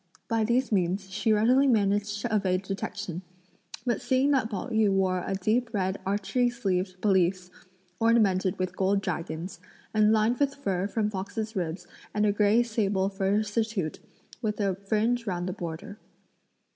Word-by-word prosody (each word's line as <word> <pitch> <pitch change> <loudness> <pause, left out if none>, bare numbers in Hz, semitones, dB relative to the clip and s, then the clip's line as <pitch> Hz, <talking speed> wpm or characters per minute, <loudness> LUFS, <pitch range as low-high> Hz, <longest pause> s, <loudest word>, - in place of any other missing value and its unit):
By 225 -1 +1
these 240 +3 +1
means 190 0 0
she 215 +3 0
readily 245 +6 +4
managed 205 -2 +1
to 225 -1 -1
evade 190 -2 +1
detection; 190 -2 -4 0.6
but 240 -2 0
seeing 265 +2 +2
that 255 -6 +2
Pao 205 +3 -4
yü 220 -3 +3
wore 185 -2 +1
a 195 - -2
deep 225 +5 0
red 190 -1 -1
archery 205 +5 +1
sleeved 185 -6 -2
pelisse, 185 -2 +2 0.5
ornamented 205 -5 +3
with 185 -1 -2
gold 195 +1 +1
dragons, 170 0 -4 0.3
and 215 -1 +4
lined 220 +2 +2
with 280 -1 +1
fur 195 -8 -1
from 210 0 -1
foxes' 215 +3 -4
ribs 175 -1 -3 0.3
and 210 0 +2
a 205 - +4
grey 210 +3 +3
sable 205 -4 0
fur 200 +2 +1
surtout 215 -5 -2 0.4
with 215 -2 -2
a 200 -2 +1
fringe 220 +5 0
round 175 -2 -2
the 185 - -2
border. 175 +5 -7
205 Hz, 160 wpm, -27 LUFS, 190-225 Hz, 0.6 s, readily